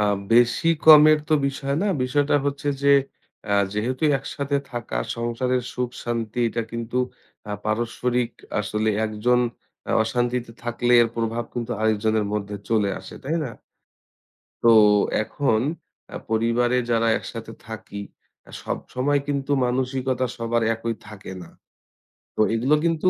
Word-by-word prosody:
আ - - +2 0.3
বেশি 120 +7 +4 0.2
কমের 155 0 +9
তো - - +1
বিষয় 140 0 -2
না। - - +1 0.2
বিষয়টা 145 +3 +1
হচ্ছে 140 +1 -2
যে 140 - +3 0.6
অ্যা 100 - +2 0.2
যেহেতু 125 +6 -2 0.2
একসাথে 140 +1 -3
থাকা 120 - -5 0.2
সংসারের 120 +2 -1
সুখ 125 -1 -2
শান্তি 115 -1 -3
এটা 115 0 -2
কিন্তু 115 +1 -4 0.5
আ - - -2
পারস্পরিক 120 +2 -1 0.3
আসলে 105 +1 -1 0.2
১ 110 - -3
জন 125 0 +4 0.5
অ - - -1
অশান্তিতে 120 +1 -1
থাকলে 120 +1 0
এর 115 - +1
প্রভাব 115 +1 -1
কিন্তু 120 -1 -4
আরেকজনের 110 0 +1
মধ্যে 105 -1 -3
চলে 110 -3 +2
আসে, - - -11
তাই 155 +5 -1
না? 125 - -4 1.1
তো 115 - +7 0.5
এখন 115 -2 0 0.5
অ্যা - - -6
পরিবারে 115 +2 +2
যারা 115 -1 +2
একসাথে 115 -1 -8 0.2
থাকি, 105 -2 -7 0.4
অ্যা - - -17
সবসময় 140 +3 -1
কিন্তু 140 -1 -2
মানসিকতা 130 0 -1
সবার 115 0 0
একই 115 0 -3
থাকে 105 -3 -9
না। - - -13 0.9
তো - - +1
এগুলো 125 +6 +3
কিন্তু 165 +2 +2
120 Hz, 140 wpm, -23 LUFS, 115-130 Hz, 1.1 s, কমের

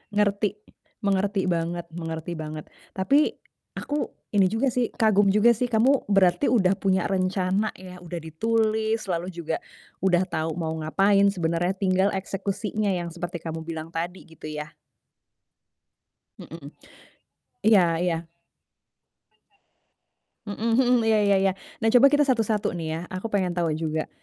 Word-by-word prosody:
Ngerti. 205 0 +2 0.5
Mengerti 200 -1 0
banget 170 0 -2
mengerti 165 0 -5
banget. 155 -1 -7 0.2
Tapi 275 +11 +2 0.4
aku 295 +1 -2 0.3
ini 200 -2 +4
juga 225 +7 +1
sih, 245 -1 0
kagum 205 -2 +3
juga 210 +4 +5
sih 235 +2 0
kamu 250 +4 +2
berarti 195 +5 +3
udah 195 -5 +3
punya 190 -2 +1
rencana 190 +2 0
ya, 185 -1 -11
udah 175 -1 -6
ditulis 220 +6 0
lalu 175 +1 -2
juga 165 -1 -3 0.4
udah 185 -1 +3
tahu 160 -2 -3
mau 165 -2 -3
ngapain, 195 +5 +3
sebenarnya 175 -1 0
tinggal 190 0 +2
eksekusinya 200 +2 -3
yang 175 -1 -4
seperti 170 0 -6
kamu 165 -1 -4
bilang 160 -1 -6
tadi 170 +3 -4
gitu 160 -2 -14
ya. 150 0 -6 1.7
MHm. - - -10 0.9
Iya 185 -6 +5
iya. 170 -2 -1 2.2
Mmm, 225 +3 -2
mhm, 245 0 +4
iya 220 -1 +3
iya 200 -1 +3
iya. 195 -1 +3 0.3
Nah - - +4
coba 255 +3 +7
kita 290 +1 +3
satu-satu 225 -6 0
nih 170 -2 -5
ya, - - -4
aku 185 +5 -4
pengen 190 -4 0
tahu 175 -1 0
juga, 160 -1 -2
190 Hz, 135 wpm, -25 LUFS, 170-215 Hz, 2.2 s, coba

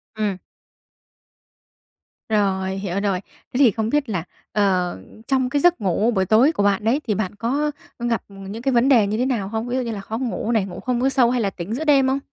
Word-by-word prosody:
Ừm. 210 -3 -1 1.9
Rồi, 190 -3 +1
hiểu 195 -1 -3
rồi. 195 -2 0 0.3
Thế - - -1
thì 260 -6 +6
không 220 +1 -2
biết 290 -3 0
là, 175 -6 -2 0.3
ờ, 185 - +1 0.3
trong 260 -2 +1
cái 285 +1 0
giấc 350 -8 +3
ngủ 200 +5 +1
buổi 190 -3 +1
tối 235 - +5
của 205 - -1
bạn 200 +1 +2
đấy 255 +7 +2
thì 210 - +1
bạn 205 -1 -3
có, 280 +7 -1 0.3
ơ, 240 - -3
gặp 230 - 0
những 195 +3 -8
cái 270 +1 +1
vấn 240 +3 +4
đề 225 -7 +5
như 215 +2 -1
thế 250 - +1
nào 230 -7 -1
hông? 225 +3 -3
Ví 245 - -2
dụ - - +1
như 235 -2 -3
là 200 -2 -5
khó 220 +3 -5
ngủ 240 -2 -2
này, 215 -4 +2
ngủ 180 - -8
không 250 -1 -1
có 265 - +3
sâu 250 -3 +3
hay 250 -2 +1
là 200 - +1
tỉnh 190 +3 -6
giữa 310 - -3
đêm 275 -3 +4
không? 270 +1 +1
225 Hz, 240 wpm, -22 LUFS, 200-255 Hz, 1.9 s, thì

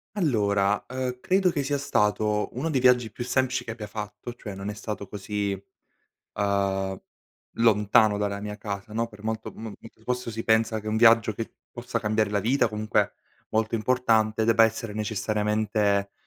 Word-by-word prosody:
Allora, 105 - +1
uhm, 125 -1 -3
credo 190 -1 +3
che 145 -3 -1
sia 145 +1 0
stato 105 -5 +1
uno 160 +5 -1
dei 135 -5 +1
viaggi 125 -3 +4
più 120 - -5
semplici 130 0 0
che 115 - -5
abbia 110 -2 -7
fatto, 105 +2 -7
cioè 105 -4 -8
non 100 +1 -5
è - - -3
stato 105 -1 -6
così, 100 0 -3 0.8
uhm, 100 -1 0 0.6
lontano 110 -1 +4
dalla 100 -1 -1
mia 105 0 -5
casa 100 +1 -6
no, 115 +1 -1
per 105 -1 -15
molto 110 0 -3
mol 110 -2 -7
mentr 110 0 -15
posso 125 -1 -2
si 115 0 -5
pensa 110 0 +2
che 110 - -13
un 110 - 0
viaggio 115 -1 +6
che 115 +2 -6 0.2
possa 120 -1 -3
cambiare 110 -2 0
la 105 - +1
vita, 115 +4 +2
comunque 105 0 0 0.3
molto 110 +1 0
importante, 110 -2 +2
debba 115 0 +5
essere 115 -1 +1
necessariamente, 105 -1 0
110 Hz, 170 wpm, -26 LUFS, 105-115 Hz, 0.8 s, viaggio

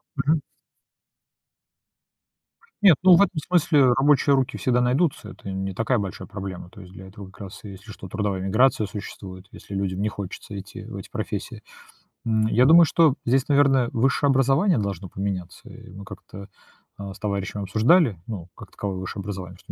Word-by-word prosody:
Мгм. 150 +2 +1 2.4
Нет, 195 -6 +7
ну, 185 -1 +8
в 185 - +5
этом 185 -4 +1
смысле 145 -7 +4
рабочие 140 +1 +3
руки 130 -1 -1
всегда 125 -1 +1
найдутся, 125 -2 0
это 95 - -10
не 95 0 -4
такая 115 +3 0
большая 95 -3 -6
проблема. 95 -3 -7
То 100 - -14
есть 90 0 -13
для 95 0 -11
этого 100 +1 -11
как 95 - -18
раз, 95 -2 -9
если 100 +1 -11
что, 95 - -10
трудовая 100 -2 -2
миграция 110 +3 +2
существует, 95 -2 -9
если 100 - -11
людям 95 -1 -2
не 105 - 0
хочется 100 0 -8
идти 95 0 -10
в - - -8
эти - - -9
профессии. - - -5 0.6
М, 110 -1 +1
я 120 +3 +3
думаю, 165 +4 +8
что 160 -1 +3
здесь, 130 +2 +2
наверное, 140 -4 +3
высшее 135 +4 +2
образование 135 - +3
должно 100 -3 -4
поменяться. 95 -2 -5
Э, - - -13
мы 100 +1 -10
как-то, 100 0 -11 0.5
а, 100 -1 -7
с - - -15
товарищем 100 -1 -3
обсуждали, 110 - +3
ну, 90 -6 -7
как - - -13
таковое 100 -2 -4
высшее 95 +2 -6
образование. 95 -2 -7
Что - - -12
105 Hz, 175 wpm, -24 LUFS, 95-135 Hz, 2.4 s, ну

